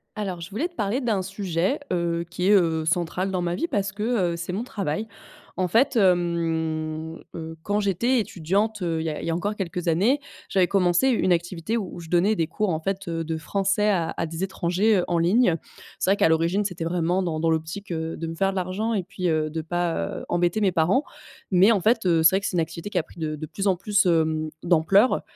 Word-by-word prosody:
Alors, 190 -5 -4
je 170 - -7
voulais 235 - -2
te 355 - -25
parler 210 +5 0
d'un 225 -7 0
sujet, 190 - -1
heu, 170 -1 -1
qui 180 +2 -2
est, - - +5
heu, 165 -5 +3
central 175 +3 0
dans 185 -2 -1
ma 175 0 -1
vie. 335 - -1
Parce 200 - -1
que, 210 +2 -5 0.3
heu, - - -3
c'est 170 +2 -5
mon 205 +5 -2
travail. 205 -4 -3 0.5
En 185 - +2
fait, 255 - +3
hem, 165 -4 0 0.2
heu, 160 -1 -6
quand 205 +1 0
j'étais 210 +6 +1
étudiante, 200 +2 -1
heu, 165 -2 -1
il - - -4
y - - 0
a 150 - -4
il - - -5
y 165 - 0
a - - 0
encore 200 +5 -2
quelques 180 -3 -4
années, 200 - +3 0.3
j'avais 185 -2 +3
commencé 180 +4 +3
une 205 -7 +3
activité 175 +5 -2
où 195 -5 -5
je 165 -1 -10
donnais 180 +5 +3
des 165 - +1
cours, 205 +5 -2
en 160 -3 0
fait, 195 +3 -3
heu, 165 -1 -2
de 160 0 -3
français 195 +5 0
à 170 -5 0
à 165 - -1
des 165 +3 -4
étrangers, 190 +3 +1
heu, 180 - +1
en 175 - +1
ligne. 180 +3 +3 0.4
C'est 190 - +1
vrai 200 - +3
qu'à - - +4
l'origine, 165 +5 +2
c'était 180 -4 -4
vraiment 175 +2 0
dans 165 -3 -2
dans 165 +1 +1
l'optique, 160 +5 -3
heu, 160 -1 -3
de 165 - -4
me 165 - -5
faire 195 +3 +1
de - - -8
l'argent 190 +5 -1
et 205 - +1
puis 185 -1 -3
heu, 155 -1 +1
de 160 +1 -3
pas, 175 +1 -1 0.2
heu, - - -9
embêter 175 +4 +1
mes 195 -2 +3
parents. 175 - +2 0.5
Mais, 190 +3 +5
en 205 -4 +2
fait, 225 +2 +2
heu, 170 -3 +3
c'est 160 +4 +6
vrai - - +3
que - - -5
c'est - - -2
une - - +3
activité 165 +4 -4
qui - - -2
a - - -2
pris 165 - -16
de 155 -1 -2
de 155 +1 -6
plus 195 +6 -4
en 190 - +4
plus, 200 +2 +1
hem, 160 -2 +1
d'ampleur 180 +7 +4
180 Hz, 245 wpm, -24 LUFS, 165-200 Hz, 0.5 s, c'est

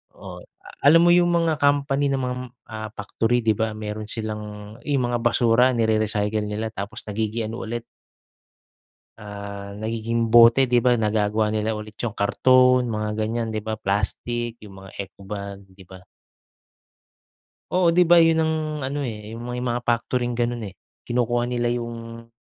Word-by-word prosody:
Oo, - - -10 0.5
alam 165 +3 +7
mo 175 - +6
'yung 175 0 +5
mga 165 -3 +1
company 145 -1 +2
ng 135 -1 0
mga, 125 0 -2 0.4
ah, 110 0 -5
factory, 115 +4 0
'di 110 -1 +3
ba, 110 -1 -1
mayro'n 105 0 -5
silang 105 -1 -6
'yung 140 -3 +1
mga 120 - 0
basura, 120 +1 +3
nire-recycle 110 -2 0
nila 110 +2 -3
tapos 105 +2 -7
nagiging 110 +1 -2
ano 115 0 -6
ulit 120 +1 -4 1.3
ah, 100 -1 -8
nagiging 115 +2 -2
bote, 120 +3 +6
'di 125 - +4
ba. 125 0 +4
Nagagawa 105 -1 +1
nila 110 +1 -1
ulit 105 0 -8
'yung 110 - -3
karton, 125 +4 +4
mga 110 -2 -3
ganyan 115 +1 -1
'di 110 -1 -4
ba, 110 - -2
plastic, 115 +3 -2
'yung 100 -2 -12
mga - - -13
eco-bag, 100 0 -7
'di 95 0 -15
ba? 95 - -10 1.7
Oo, 180 -2 +3
'di 175 0 +4
ba 175 - +7
'yun 165 0 +3
ang 160 0 +1 0.3
ano 140 +1 -3
eh, 105 -4 -6
eh - - -8
'yung 115 - -8
may 125 0 -4
mga 120 -1 -2
factory 120 +1 0
na 120 - -5
ganun 120 -1 -1
eh. - - -21 0.3
Kinukuha 120 0 0
nila 120 -1 0
'yung 115 -1 -5
115 Hz, 165 wpm, -23 LUFS, 105-125 Hz, 1.7 s, alam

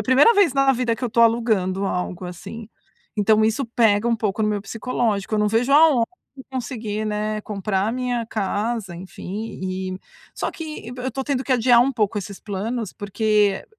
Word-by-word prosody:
a - - -1
primeira 270 - +5
vez 400 - +4
na 275 0 +4
vida 240 -2 0
que 245 - -4
eu 245 - 0
tô 235 - +2
alugando 220 -5 +2
algo, 180 0 -3
assim. 200 +5 -8 0.5
Então, 215 +1 +4
isso 225 +5 +1
pega 230 -2 +2
um 230 - +2
pouco 215 -1 -1
no 215 - +2
meu 210 -1 -1
psicológico, 220 -2 -2
eu - - +1
não 210 - +2
vejo 235 +5 +1
a 315 +3 +8
ho 250 -7 +3 0.3
de 265 - -9
conseguir, 225 -5 -4
né, 215 0 -2
comprar 195 -1 -1
a 225 - -1
minha 245 -2 -1
casa, 210 -2 -2
enfim, 190 +4 -7
e 185 0 -3 0.4
Só - - -2
que 305 -8 -7
be 250 - -7
eu 260 - -2
tô 270 - -3
tendo 270 -2 -1
que 265 - +1
adiar 245 -1 +5
um 270 +3 +2
pouco 210 -3 0
esses 200 0 -7
planos, 215 +2 -4
porque 205 -1 +1
220 Hz, 200 wpm, -22 LUFS, 205-245 Hz, 0.5 s, a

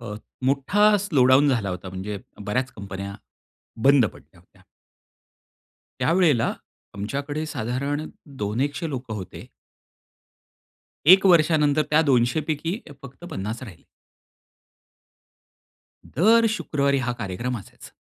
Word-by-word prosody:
अ, 110 -3 -7 0.3
मोठा 190 +11 +3
slow 170 -11 +2
down 130 +3 +5
झाला 115 -7 0
होता. 90 +1 -6
म्हणजे 95 +2 -5 0.3
बऱ्याच 125 +5 -1
कंपन्या, 100 -2 -7 0.7
बंद 135 -3 +6
पडल्या - - -11
होत्या. - - -25 1.4
त्यावेळेला 165 -9 +3 0.4
आमच्याकडे 140 +9 -4
साधारण 140 +4 -3 0.3
दोन 105 +3 -2
एकशे 145 +4 -2
लोकं 125 -4 -5
होते. 95 -4 -8 1.7
1 170 -4 +4
नंतर 150 0 +2
त्या 150 +1 +5
200 125 +2 +3
पैकी 165 +6 -2 0.2
फक्त 140 +5 -12
50 110 +6 -5
राहिले. 100 -9 -12 2.3
दर 225 +6 +5
,शुक्रवारी 140 -5 0
हा 125 - 0
कार्यक्रम 115 +5 -3
असायचा. 95 - -14
135 Hz, 105 wpm, -24 LUFS, 110-155 Hz, 2.3 s, बंद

